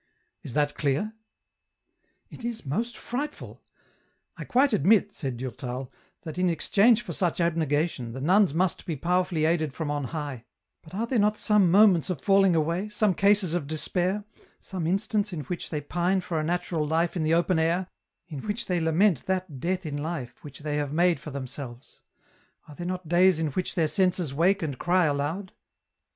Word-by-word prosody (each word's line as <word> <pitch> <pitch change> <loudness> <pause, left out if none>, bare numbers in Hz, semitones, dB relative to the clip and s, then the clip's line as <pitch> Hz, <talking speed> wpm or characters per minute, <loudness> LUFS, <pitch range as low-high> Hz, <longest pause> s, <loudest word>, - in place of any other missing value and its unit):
Is 140 - -8
that 145 -1 +1
clear? 150 +10 -1 0.4
" - - -57
" - - -46
It - - -11
is 235 -5 -4
most 225 - -2
frightful! 290 +5 -5 0.7
I - - -7
quite 265 +3 +3
admit," 200 +5 +3
said 135 -9 -4
Durtal, 125 0 -5 0.2
" - - -43
that 165 0 -6
in 180 0 +3
exchange 215 +7 +3
for - - -6
such 180 -3 0
abnegation, 155 -6 0
the 130 - -6
nuns 185 +6 +4
must 175 +4 -1
be 165 - -2
power 180 +6 +1
fvilly 160 -4 0
aided 160 -4 0
from 155 -3 -3
on 145 -2 -2
high, 145 -5 -5 0.4
but 165 +3 -12
are 225 +4 -1
there 235 0 0
not 210 +1 +2
some 210 -4 +3
moments 190 -3 +5
of 180 -6 -2
falling 195 +1 +4
away, 170 +6 0
some 210 -1 +2
cases 200 -2 +3
of 170 -5 -2
despair, 180 +6 -1 0.4
some 180 -4 -4
instants 205 +2 0
in 160 - -3
which 170 +6 -5
they 150 -2 -3
pine 175 +6 0
for 175 -3 -3
a - - -1
natural 170 -1 -1
life 165 +3 0
in 175 - -1
the 155 +1 +2
open 170 0 +2
air, 170 +3 +1 0.4
in 150 -5 -7
which 220 +3 -2
they 180 -2 0
lament 160 0 +2
that 185 -7 -2
death 185 +4 -2
in 145 -2 -3
life 145 -4 -5
which 145 0 -11
they 150 0 -2
have 145 -2 -2
made 175 +2 +2
for - - -8
themselves; 130 -2 -8 0.7
are 150 - -11
there 175 +4 -6
not 180 -2 -4
days 180 +1 +4
in 160 -1 0
which 180 +6 -2
their 165 -3 +2
senses 180 -2 +1
wake 175 +6 +2
and 140 -5 -4
cry 180 0 +3
aloud 150 +7 -2
170 Hz, 195 wpm, -26 LUFS, 150-190 Hz, 0.7 s, moments